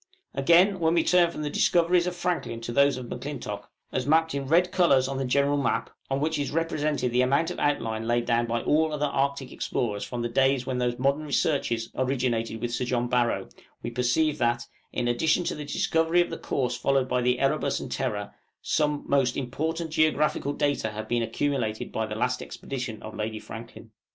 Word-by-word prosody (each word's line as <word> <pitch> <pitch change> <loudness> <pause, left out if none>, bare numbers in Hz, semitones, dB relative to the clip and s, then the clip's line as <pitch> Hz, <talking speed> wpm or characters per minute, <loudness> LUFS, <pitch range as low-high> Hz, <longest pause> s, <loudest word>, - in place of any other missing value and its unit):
" 380 - -46
Again, 175 +7 +4
when 165 0 +2
we 165 - +3
turn 175 -1 +4
from 150 -2 -6
the 150 - -2
discoveries 175 +2 +3
of 180 - -2
Franklin 175 -10 -2
to 115 - -5
those 140 +1 +3
of 130 - -6
M'Clintock, - - -6 0.2
as 130 0 -2
mapped 160 +1 +3
in 140 -1 -3
red 175 +4 +3
colors 140 -9 +4
on 135 0 -3
the 135 - -1
general 140 +3 +2
map, 140 - -1 0.2
on 135 0 0
which 155 +1 0
is 140 - -1
represented 150 -5 -1
the 125 +1 +3
amount 140 +7 +2
of - - -6
outline 115 -6 0
laid 120 0 +1
down 120 0 +1
by 115 0 -1
all 155 +1 +2
other 150 -1 0
Arctic 140 -1 -1
explorers 105 -4 -2
from 120 -1 -4
the - - 0
days 135 +1 +2
when 130 -1 -2
these 120 -1 0
modern 140 +3 +1
researches 140 -6 0
originated 125 -4 -1
with 120 -1 -2
Sir 120 +1 -1
John 120 -1 -1
Barrow, 120 -1 +1 0.4
we - - -3
perceive 125 +5 +1
that, 120 -1 +1 0.3
in 120 - -1
addition 160 +8 +2
to - - -1
the 150 -1 -6
discovery 165 +3 +1
of 175 - -1
the - - -4
course 125 -2 -1
followed 135 +1 +1
by 125 0 0
the 125 0 +2
'Erebus' 135 +1 +1
and - - -7
'Terror,' - - -3 0.3
some 150 -1 0
most 135 -3 +2
important 160 +5 -3
geographical 155 -2 +1
data 145 -6 0
have 110 0 -6
been 120 0 +1
accumulated 115 -3 -2
by 110 0 -2
the 105 - -5
last 125 +3 0
expedition 120 -5 -6
of 110 - -7
Lady 110 +1 -3
Franklin. 115 +1 -10
135 Hz, 205 wpm, -26 LUFS, 120-155 Hz, 0.4 s, Again